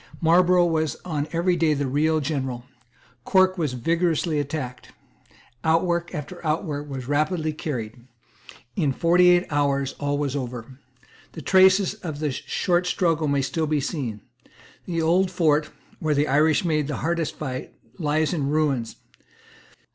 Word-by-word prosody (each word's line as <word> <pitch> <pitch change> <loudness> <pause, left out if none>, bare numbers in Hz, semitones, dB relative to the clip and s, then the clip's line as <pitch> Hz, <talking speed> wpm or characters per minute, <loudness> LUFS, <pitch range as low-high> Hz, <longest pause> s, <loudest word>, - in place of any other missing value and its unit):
Marlborough 175 +2 +4
was 160 -2 0
on 150 -4 -2
every 175 +2 +1
day 160 -3 +2
the 140 0 -1
real 155 +4 +1
general. 135 -4 -3 0.6
Cork 185 +3 +3
was 150 -6 -1
vigorously 165 +3 0
attacked. 140 -3 -5 0.7
Outwork 170 +1 +1
after 165 +5 -7
outwork 150 -2 -2
was 130 -3 -6
rapidly 155 +2 0
carried. 120 -6 -6 0.7
In 150 -7 +1
forty 175 +4 +4
eight 175 0 +4
hours 140 -2 0
all 145 0 -1
was 145 -1 -2
over. 125 -1 -6 0.5
The 160 - -8
traces 190 +2 +5
of 170 -8 -7
the 150 -1 -1
short 175 +6 -1
struggle 165 -4 +1
may 140 -1 +1
still 160 +3 -1
be 150 0 +1
seen. 135 - -4 0.7
The 165 -2 -1
old 180 +4 +3
fort, 155 -4 +1 0.3
where 155 -2 0
the 145 +2 +2
Irish 155 +5 +3
made 155 -4 +1
the 145 - -3
hardest 170 -1 -1
fight, 130 -4 -5 0.3
lies 155 +1 +1
in 145 -5 -1
ruins. 145 -6 0
155 Hz, 145 wpm, -24 LUFS, 140-170 Hz, 0.7 s, traces